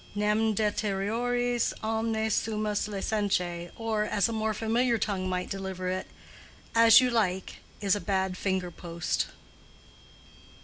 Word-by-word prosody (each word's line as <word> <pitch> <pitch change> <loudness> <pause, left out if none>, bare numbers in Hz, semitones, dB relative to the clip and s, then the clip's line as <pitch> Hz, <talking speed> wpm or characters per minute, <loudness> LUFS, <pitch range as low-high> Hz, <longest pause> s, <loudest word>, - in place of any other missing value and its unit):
Nam 210 +1 +2
deteriores 225 +4 0
omnes 220 0 0
sumus 210 -2 0
licentiæ, 190 -4 -1
or, 225 -2 -1
as 210 0 +1
a 230 - -3
more 220 0 0
familiar 235 +2 +1
tongue 195 -3 -1
might 180 0 -2
deliver 190 -2 -3
it, 185 0 -3 0.7
_"As 230 +1 +8
you 250 -1 +2
like" 190 -5 0 0.2
is 200 -1 +3
a 205 - -3
bad 190 -2 0
finger 185 -1 -1
post. 170 0 -2
210 Hz, 125 wpm, -28 LUFS, 190-225 Hz, 0.7 s, As